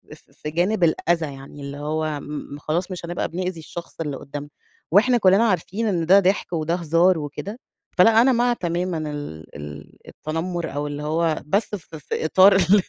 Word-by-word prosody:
ف - - -24
في 150 - -7
جانب 180 +5 +1
الأذى، 165 -2 +1
يعني 135 +2 -11
اللي 140 0 -6
هو 155 0 -2
م 145 -1 -7
خلاص 175 +6 -2
مش 175 -2 -5
هنبقى 175 +1 -2
بنؤذي 180 0 -3
الشخص 170 +1 -9
اللي 145 -4 -3
قدامنا، 145 +1 -7 0.4
وإحنا 240 +6 +5
كلنا 195 +1 +5
عارفين 195 +3 -1
إن 170 -5 0
ده 195 +4 +7
ضحك 190 -1 0
وده 165 +1 0
هزار 170 +1 +3
وكده، 155 - -6 0.4
فلأ 225 +5 +7
أنا 260 +2 +5
مع 240 0 +3
تمامًا 175 -3 -2
ال 80 - -8
ال 75 0 -9
التنمّر 165 +1 -4
أو 145 +1 -2
اللي 145 0 -5
هو 160 +1 0
بس 200 +5 0
في 160 -4 -10
في 145 - -3
إطار 190 +4 +6
ال 190 +2 +5
170 Hz, 180 wpm, -23 LUFS, 150-190 Hz, 0.4 s, ده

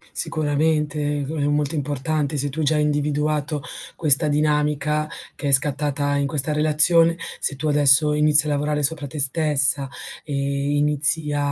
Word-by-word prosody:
Sicuramente 150 0 -1 0.2
e 140 - -3
g 145 - -6
è 145 - -2
molto 145 +1 -1
importante 145 +1 -2
se 145 +1 -1
tu 155 +3 -4
già 150 +2 +1
hai 150 - +1
individuato 150 0 -1 0.3
questa 155 -1 +2
dinamica 150 0 0 0.3
che 145 - -4
è - - 0
scattata 145 +1 +1
in 140 0 0
questa 145 +1 -1
relazione, 155 +2 +3 0.2
se - - -2
tu 155 +3 -3
adesso 150 0 +4
inizi 150 0 +4
a - - -3
lavorare 150 +1 -1
sopra 145 0 -2
te 145 +2 -6
stessa 140 -1 +1 0.4
e 150 - -7 0.4
inizi 150 +1 +1
a 145 - -1
150 Hz, 160 wpm, -21 LUFS, 145-150 Hz, 0.4 s, adesso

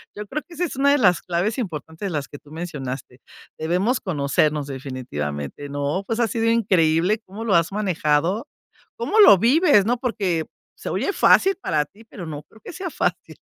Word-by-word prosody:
yo 210 0 -7
creo 305 +8 -4
que 350 - -14
esa 355 +2 -1
es 335 - -6
una 280 +2 +3
de 290 - +4
las 180 -5 +4
claves 180 +7 -1
importantes 160 - -5
de - - -4
las 145 -3 -3
que 145 - -10
tú 145 - -19
mencionaste. 135 -6 -6 0.4
Debemos 185 +10 0
conocernos 150 -2 0
definitivamente, 125 - -5
¿no? 145 +6 -2
Pues, 225 +3 -2
ha 235 - +3
sido 225 +1 -1
increíble 190 -3 +2
cómo 200 +4 -8
lo 205 - +2
has 170 +2 +2
manejado, 180 -1 0 0.5
cómo 380 - 0
lo 205 - +9
vives, 245 - +4
¿no? 245 +2 +1
Porque 195 -10 -1 0.3
se - - -7
oye 400 - -1
fácil 390 0 +5
para 150 -1 0
ti, 215 +3 -19
pero 195 -5 -9
no 150 -2 -6
creo 220 - -21
que - - -9
sea 370 0 -5
fácil. - - -2
180 Hz, 190 wpm, -22 LUFS, 150-230 Hz, 0.5 s, lo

